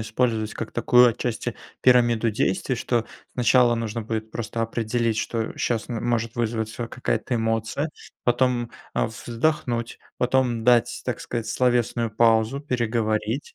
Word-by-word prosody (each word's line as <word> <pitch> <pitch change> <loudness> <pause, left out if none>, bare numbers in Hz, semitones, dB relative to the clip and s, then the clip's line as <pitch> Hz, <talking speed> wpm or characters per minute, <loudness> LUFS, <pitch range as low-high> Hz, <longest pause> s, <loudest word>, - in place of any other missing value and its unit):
использовать 110 -1 -1
как 115 - -5
такую, 125 +1 +5
отчасти, 115 -1 -3 0.3
пирамиду 120 -3 +4
действий. 105 +4 0
Что 115 -1 0 0.3
сначала 125 0 +4
нужно 115 0 -3
будет 110 0 -4
просто 115 0 -3
определить, 115 0 -1
что 115 0 -2
щас 115 -2 -1
м 120 -2 -4
может 115 -1 0
вызваться 115 0 -2
какая-то 120 0 -2
эмоция, 115 +6 -1 0.4
потом, 120 -1 +1 0.2
э, - - +2
вздохнуть, 120 +1 -2 0.2
потом 125 -2 +1
дать, 120 0 +3
так 125 - -3
сказать, 115 -2 -4
словесную 120 -2 +1
паузу, 115 +4 +3
переговорить, 115 -2 -1
115 Hz, 130 wpm, -24 LUFS, 110-125 Hz, 0.4 s, такую